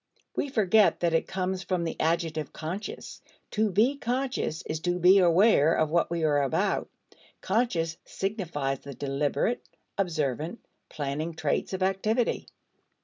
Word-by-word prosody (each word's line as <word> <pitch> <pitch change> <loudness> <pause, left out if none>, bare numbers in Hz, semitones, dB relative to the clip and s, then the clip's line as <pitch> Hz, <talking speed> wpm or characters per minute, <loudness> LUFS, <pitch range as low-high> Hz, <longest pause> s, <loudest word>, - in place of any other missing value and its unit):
We 285 - -1
forget 215 -4 +3
that 170 -1 +2
it 165 - +1
comes 185 0 -2
from 180 -1 -1
the 165 - -3
adjective 160 -2 0
"conscious." 180 +7 -6 0.3
To 215 0 +1
be 230 +9 +2
conscious 250 - -2
is 155 - -3
to 175 +2 -1
be 180 +3 +6
aware 175 -2 +5
of 155 -1 +1
what 170 0 +2
we 170 -1 -2
are 145 -2 +3
about; 135 -2 0 0.5
conscious 185 -7 0
signifies 165 - -3
the 140 -1 -9
deliberate, 145 - -1 0.4
observant, 160 - -2 0.2
planning 150 +3 -3
traits - - -1
of 190 0 -1
activity. 215 +5 0
175 Hz, 140 wpm, -28 LUFS, 155-200 Hz, 0.5 s, be